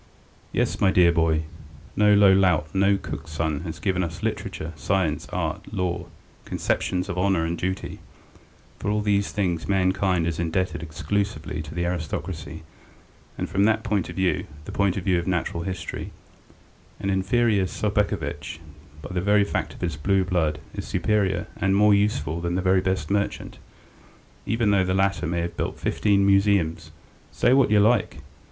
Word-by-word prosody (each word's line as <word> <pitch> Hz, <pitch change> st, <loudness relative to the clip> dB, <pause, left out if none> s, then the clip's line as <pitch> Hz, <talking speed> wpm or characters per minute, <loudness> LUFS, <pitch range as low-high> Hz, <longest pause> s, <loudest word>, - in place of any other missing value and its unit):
Yes, -, -, -1 dB
my 95 Hz, -, +5 dB
dear 90 Hz, -2 st, +5 dB
boy, 80 Hz, -2 st, +2 dB, 0.5 s
no 105 Hz, 0 st, +5 dB
low 100 Hz, -1 st, +7 dB
lout, 90 Hz, -5 st, +2 dB
no 100 Hz, +1 st, +3 dB
cook's 80 Hz, -4 st, -7 dB
son 80 Hz, -2 st, -1 dB
has 80 Hz, 0 st, -6 dB
given 95 Hz, +2 st, 0 dB
us 85 Hz, -1 st, -6 dB
literature, 80 Hz, +1 st, -3 dB
science, 90 Hz, -2 st, -1 dB
art, -, -, -3 dB
law, 90 Hz, -3 st, -2 dB, 0.4 s
conceptions 90 Hz, +1 st, -1 dB
of 90 Hz, -2 st, -3 dB
honour 95 Hz, -3 st, +2 dB
and 85 Hz, +1 st, -1 dB
duty.... 95 Hz, +2 st, -4 dB, 0.8 s
For -, -, -2 dB
all 105 Hz, 0 st, +1 dB
these 100 Hz, -1 st, +1 dB
things 90 Hz, -5 st, -1 dB
mankind 95 Hz, -2 st, +1 dB
is 85 Hz, -1 st, -2 dB
indebted 85 Hz, +1 st, -1 dB
exclusively 80 Hz, -1 st, -3 dB
to 80 Hz, +1 st, -9 dB
the 85 Hz, 0 st, -1 dB
aristocracy, 80 Hz, -1 st, -4 dB, 0.7 s
and -, -, -2 dB
from 100 Hz, +1 st, +2 dB
that 110 Hz, 0 st, +2 dB
point 105 Hz, -5 st, -1 dB
of -, -, -7 dB
view, 95 Hz, -1 st, 0 dB, 0.2 s
the -, -, -7 dB
point 100 Hz, -1 st, +1 dB
of 95 Hz, -, -3 dB
view 90 Hz, -2 st, +2 dB
of 85 Hz, -, -5 dB
natural 90 Hz, -2 st, -1 dB
history, 85 Hz, -2 st, -5 dB, 0.9 s
an 95 Hz, -, -1 dB
inferior 100 Hz, +1 st, +2 dB
Sobakevitch 105 Hz, -5 st, -2 dB, 0.5 s
by -, -, -7 dB
the 90 Hz, -, 0 dB
very 105 Hz, +2 st, +4 dB
fact 100 Hz, -, -3 dB
of -, -, -14 dB
his 85 Hz, -6 st, -2 dB
blue 95 Hz, +5 st, +2 dB
blood 85 Hz, -5 st, 0 dB, 0.2 s
is -, -, -6 dB
superior 95 Hz, -1 st, 0 dB
and 95 Hz, 0 st, +1 dB
more 105 Hz, +1 st, +5 dB
useful 85 Hz, -6 st, 0 dB
than 85 Hz, +1 st, -1 dB
the 90 Hz, -, -1 dB
very 95 Hz, 0 st, +3 dB
best 95 Hz, +1 st, -1 dB
merchant, 100 Hz, 0 st, -2 dB, 0.9 s
even 110 Hz, -1 st, +2 dB
though 100 Hz, -2 st, +4 dB
the 95 Hz, 0 st, 0 dB
latter 95 Hz, -4 st, +1 dB
may 85 Hz, +1 st, -1 dB
have 85 Hz, 0 st, -4 dB
built -, -, -3 dB
fifteen 100 Hz, -2 st, +2 dB
museums. 100 Hz, -4 st, +2 dB, 0.4 s
Say 125 Hz, -, +3 dB
what 135 Hz, -4 st, +4 dB
you 105 Hz, 0 st, +5 dB
like! 110 Hz, 0 st, +2 dB
95 Hz, 170 wpm, -24 LUFS, 85-100 Hz, 0.9 s, low